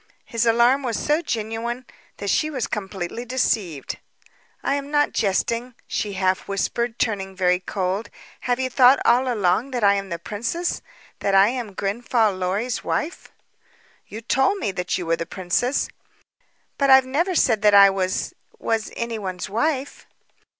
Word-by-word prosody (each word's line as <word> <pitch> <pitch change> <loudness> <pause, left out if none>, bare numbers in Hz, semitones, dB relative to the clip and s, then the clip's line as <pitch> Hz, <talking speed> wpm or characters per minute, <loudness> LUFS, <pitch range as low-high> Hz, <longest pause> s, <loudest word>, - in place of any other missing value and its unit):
His 230 0 -1
alarm 240 +4 +4
was 240 -5 -2
so 300 +3 +1
genuine 235 -1 -3 0.3
that 200 - -2
she 310 - +1
was 265 -6 -2
completely 195 +1 -4
deceived. 215 - -1 0.6
"I - - +1
am 280 0 -3
not 295 0 +2
jesting," 230 +5 -1
she 205 -1 -3
half 185 -1 0
whispered, 230 +4 -2
turning 195 -4 -2
very 180 -1 +2
cold. 190 +3 -3 0.3
"Have 245 0 -1
you 260 - 0
thought 255 +1 +6
all 250 +2 +4
along 210 +3 +1
that 245 -4 -3
I 200 0 +6
am 195 -1 -3
the 170 - -3
princess 230 - -3 0.4
that 195 - +1
I 195 +2 +6
am 235 -5 -5
Grenfall 220 +2 +1
Lorry's 195 +7 -2
wife?" 325 +4 -3 0.8
"You 220 - -8
told 270 - +2
me 210 - -2
that 180 -1 -2
you 180 - -4
were 165 0 +1
the 165 - -4
princess." 195 +9 0 0.9
"But 275 -1 +3
I've 265 -1 +7
never 335 +8 0
said 225 -9 +3
that 210 -1 +5
I 200 -1 +8
was 190 -1 -2 0.2
was 225 -1 -2
anyone's 210 -5 -4
wife." 275 +4 -2
225 Hz, 155 wpm, -23 LUFS, 195-255 Hz, 0.9 s, I